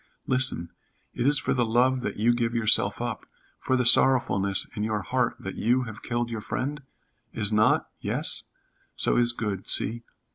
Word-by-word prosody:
Listen, 125 -10 +2 0.4
it 120 - -1
is 145 +1 +4
for - - -1
the 125 - +1
love 125 +3 +1
that - - -5
you 115 +3 +2
give 120 0 -2
yourself 115 -2 +2
up - - -4 0.4
for 130 - 0
the 125 - 0
sorrowfulness 100 -7 +4
in 105 - -4
your 105 -2 -2
heart 125 +3 -1
that 95 - -6
you 125 +3 0
have 115 -3 -9
killed 120 0 -3
your 110 -2 -4
friend? 145 +7 -4 0.5
Is 105 +1 0
not? 105 0 +2
Yes. - - 0 0.5
So - - 0
is 120 0 +3
good. 105 -5 -5
See. 115 +2 +1
120 Hz, 175 wpm, -25 LUFS, 105-125 Hz, 0.5 s, is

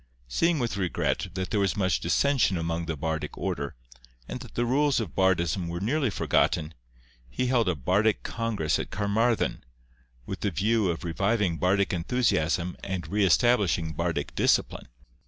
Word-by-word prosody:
Seeing 165 - +1
with 120 -6 -2
regret 90 -4 -1
that 95 -1 -3
there 105 - +1
was 100 0 +1
much 95 -9 +1
dissension 135 - +2
amongst 85 0 -2
the 80 -2 -3
bardic 80 +1 -3
order, 70 0 -3 0.5
and - - -5
that - - -12
the 120 - +1
rules 140 +2 +2
of 100 -11 -4
bardism 90 -2 +1
were 85 +1 -4
nearly 130 - 0
forgotten, 80 -5 +1 0.6
he 125 - -2
held 120 -5 +2
a 90 - 0
bardic 95 - +1
congress 115 -9 -1
at - - -4
Carmarthen, 100 - 0 0.6
with - - -5
the 100 - 0
view 105 +2 +1
of 85 - -3
reviving 95 +1 0
bardic 95 +4 +2
enthusiasm 90 -3 0
and 90 -5 -4
re 105 +3 +1
establishing 95 -3 +3
bardic - - -2
discipline. - - +1
95 Hz, 155 wpm, -27 LUFS, 85-115 Hz, 0.6 s, establishing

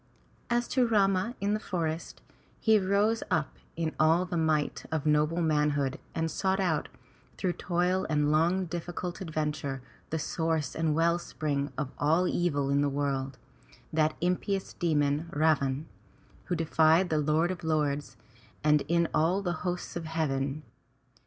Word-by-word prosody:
As 240 0 +1
to 255 -2 +2
Rama 200 +1 +2
in 200 +1 0
the 215 - 0
forest, 165 -5 -4 0.2
— - - -33
he 220 -2 +4
rose 205 +4 +2
up 155 -2 -1 0.2
in 160 -1 -2
all 165 +3 +4
the 180 -1 -4
might 155 -3 0
of 160 -2 -1
noble 155 +3 +2
manhood 150 -3 +1 0.2
and 160 0 -1
sought 190 0 0
out, 160 -6 0 0.5
through 185 -3 0
toil 180 +2 0
and 150 -1 +2
long 165 +4 +3
and 185 -3 -3
difficult 175 +1 -4
adventure, 150 -5 -2 0.3
the 160 - -1
source 160 -2 -1
and 160 -2 +1
well 170 +1 +3
spring 145 -4 -2
of 145 -4 -3
all 160 +5 +3
evil 145 -7 0
in 140 0 +3
the 145 - +2
world, 135 -2 -2 0.6
that 155 0 +2
impious 185 +2 -1
demon, 150 -1 0
Ravan, 145 -2 +1 0.6
who 175 - -1
defied 165 +2 +3
the 155 - +2
Lord 155 +4 +2
of 185 - -6
Lords, 150 -2 -1 0.5
and 150 -1 +4 0.3
all 180 +5 +2
the 175 -2 0
Hosts 180 0 -3
of 170 -1 -4
Heaven. 150 -2 -1
160 Hz, 150 wpm, -29 LUFS, 150-180 Hz, 0.6 s, he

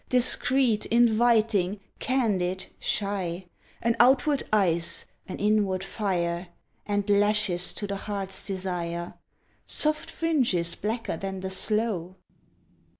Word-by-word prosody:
Discreet, 250 -2 +3
inviting, 225 -4 +3 0.2
candid, 195 -8 0
shy, 190 -3 -2 0.4
An 230 0 +2
outward 270 +3 +4
ice, 170 -5 +2 0.2
an 185 - -6
inward 205 -3 +1
fire, 175 -4 -2 0.4
And 205 -1 -1
lashes 205 -3 +2
to 205 - -5
the 200 0 -4
heart's 195 -1 -3
desire 175 -3 -4 0.5
Soft 305 0 +1
fringes 245 - 0
blacker 220 -4 -3
than 195 0 -5
the 190 0 -4
sloe. 190 -3 0
205 Hz, 100 wpm, -26 LUFS, 185-230 Hz, 0.5 s, outward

